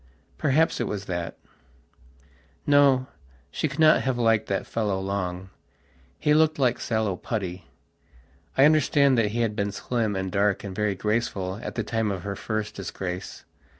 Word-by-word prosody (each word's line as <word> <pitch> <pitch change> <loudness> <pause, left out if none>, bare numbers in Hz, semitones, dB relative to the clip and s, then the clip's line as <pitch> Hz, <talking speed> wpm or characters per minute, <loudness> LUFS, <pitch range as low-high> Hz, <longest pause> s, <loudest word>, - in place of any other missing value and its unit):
Perhaps 155 +4 +2
it - - -1
was 100 -1 -4
that.... 85 -2 -4 1.3
No, 140 -3 +5 0.5
she - - -1
cannot 155 +2 +4
have 130 -2 -1
liked 115 -2 +2
that 100 - -1
fellow 105 -4 -1
long. 95 -1 -3 0.7
He 150 - +2
looked 155 0 +3
like 125 -3 +2
sallow 110 -4 -1
putty. 95 -3 -4 0.9
I 135 - +7
understand 145 -2 +4
that 105 -2 +2
he 120 +3 -1
had 110 -2 0
been 100 -1 -1
slim 110 0 -2
and 95 -1 -3
dark 100 +1 +1
and 100 -2 -6
very 105 -1 0
graceful 100 -2 -2
at - - -6
the 115 - -1
time 110 0 -1
of 95 -3 -4
her 100 -1 -4
first 110 0 -3
disgrace. 95 -1 -6
105 Hz, 155 wpm, -25 LUFS, 95-130 Hz, 1.3 s, I